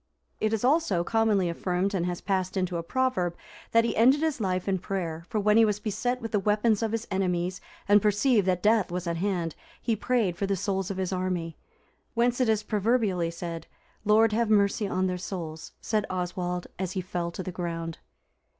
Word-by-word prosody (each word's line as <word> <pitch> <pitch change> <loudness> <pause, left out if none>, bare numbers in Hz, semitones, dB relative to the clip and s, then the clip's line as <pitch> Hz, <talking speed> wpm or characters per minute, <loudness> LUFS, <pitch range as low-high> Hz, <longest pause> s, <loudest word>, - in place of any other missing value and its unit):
It 215 - +1
is 225 0 -1
also 255 - +2
commonly 215 -2 +2
affirmed 180 +3 -1
and 180 -2 0
has 175 -1 -3
passed 190 -1 -1
into 180 -2 0
a - - -2
proverb, 185 -3 0 0.3
that 230 0 +4
he 230 - -1
ended 260 +6 +5
his 315 -6 0
life 185 -2 -1
in 190 -1 +1
prayer; 170 -3 -4
for 220 - 0
when 210 +1 +4
he 225 - +7
was 210 -2 +1
beset 235 +4 -2
with 225 - -4
the 210 - +2
weapons 210 +2 +2
of 225 -1 0
his 225 0 -2
enemies, 180 -1 -1 0.3
and 205 0 +6
perceived 210 0 +3
that 180 -1 +1
death 215 -2 +3
was 180 0 -3
at 170 -1 -1
hand, 175 -3 -1 0.3
he 230 - 0
prayed 215 -5 0
for 195 - -1
the 200 - +1
souls 195 0 -2
of 195 - -4
his 190 0 -1
army. 180 -3 -2 0.6
Whence 245 +2 +2
it 245 - +3
is 215 -1 +2
proverbially 210 -5 +1
said, 170 0 -6 0.2
" - - -35
'Lord 215 +1 +4
have 230 0 +1
mercy 205 0 +3
on 185 -1 0
their 180 -1 -1
souls,' 160 -4 -6
said 215 -2 0
Oswald, 180 -1 -2
as 185 -1 -2
he 190 - -1
fell 175 -1 -3
to 180 +2 -6
the 185 - -5
ground." 165 -2 -4
195 Hz, 205 wpm, -27 LUFS, 180-220 Hz, 0.6 s, he